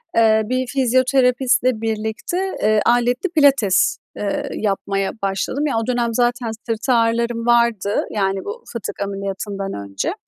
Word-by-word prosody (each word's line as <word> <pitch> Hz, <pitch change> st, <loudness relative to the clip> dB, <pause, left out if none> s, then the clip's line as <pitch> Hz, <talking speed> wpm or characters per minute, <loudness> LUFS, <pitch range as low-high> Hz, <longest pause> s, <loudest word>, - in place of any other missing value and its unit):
Eee, 220 Hz, -1 st, +4 dB
bir 255 Hz, +3 st, -1 dB
fizyoterapistle 255 Hz, -1 st, +2 dB
birlikte, 220 Hz, +8 st, -3 dB, 0.3 s
eee, 215 Hz, 0 st, +3 dB
aletli 245 Hz, +8 st, +2 dB
pilates, 275 Hz, -, +3 dB, 0.2 s
eee, 205 Hz, -1 st, -2 dB
yapmaya 195 Hz, -1 st, -1 dB
başladım. 200 Hz, +9 st, -1 dB
Ya, 275 Hz, -, -1 dB
o 225 Hz, 0 st, -2 dB
dönem 240 Hz, -2 st, 0 dB
zaten 240 Hz, -1 st, 0 dB, 0.2 s
sırt 230 Hz, +2 st, -3 dB
ağrılarım 230 Hz, -1 st, +1 dB
vardı, 235 Hz, -4 st, +2 dB
yani 195 Hz, -2 st, -1 dB
bu 465 Hz, +3 st, -6 dB
fıtık 235 Hz, -3 st, -5 dB
ameliyatından 195 Hz, 0 st, -4 dB
önce, 100 Hz, -1 st, -3 dB
230 Hz, 130 wpm, -20 LUFS, 205-250 Hz, 0.3 s, Eee